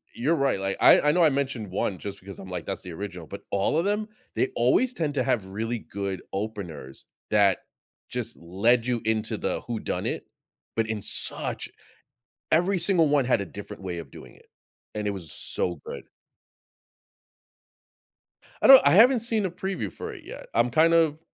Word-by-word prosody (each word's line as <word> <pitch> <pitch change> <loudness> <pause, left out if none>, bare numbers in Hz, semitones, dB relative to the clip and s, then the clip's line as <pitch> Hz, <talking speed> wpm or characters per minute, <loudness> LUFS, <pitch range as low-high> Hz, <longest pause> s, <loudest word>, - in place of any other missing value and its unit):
you're 150 +8 +1
right, 135 -8 +1
like, 95 0 -1
I - - +8
I 150 - +4
know 170 +2 +3
I 155 - +6
mentioned 135 -6 -2
1 95 0 -1
just 100 +2 -7
because 100 +1 -10
I'm 95 - -9
like, 90 -3 -5
"That's 95 - -4
the 90 - -8
original." 90 -1 -6
But - - -8
all 100 +6 +1
of 170 - +1
them, 210 +1 0 0.3
they - - +1
always 130 - +3
tend 155 - -2
to 130 - +2
have 110 -4 0
really 115 +4 -3
good 100 -2 -5
openers 95 -10 -4 0.3
that 100 -2 +4 0.5
just 120 -2 -4
led 115 +8 +2
you 120 -2 0
into 110 0 0
the - - -2
whodunit, 115 -3 -3 0.5
but 115 -1 +1
in 110 -2 -3
such - - -5 0.8
every 180 +4 +3
single 170 -3 +3
one 145 -2 +3
had 125 - +3
a - - -3
different 100 +2 -9
way 90 -2 -4
of 75 -5 -9
doing - - -12
it, - - -22 0.5
and 105 -1 -2
it - - +1
was 85 -6 -8
so 90 +3 -3
good. - - -7 2.6
I - - +5
don't 270 -1 +11
I - - +6
haven't 235 +4 +6
seen 225 -3 0
a 180 - -2
preview 180 - -4
for - - -7
it - - -11
yet. - - -9
I'm 120 +1 +3
kind 160 +7 +4
of 160 -2 +3
115 Hz, 185 wpm, -26 LUFS, 100-155 Hz, 2.6 s, don't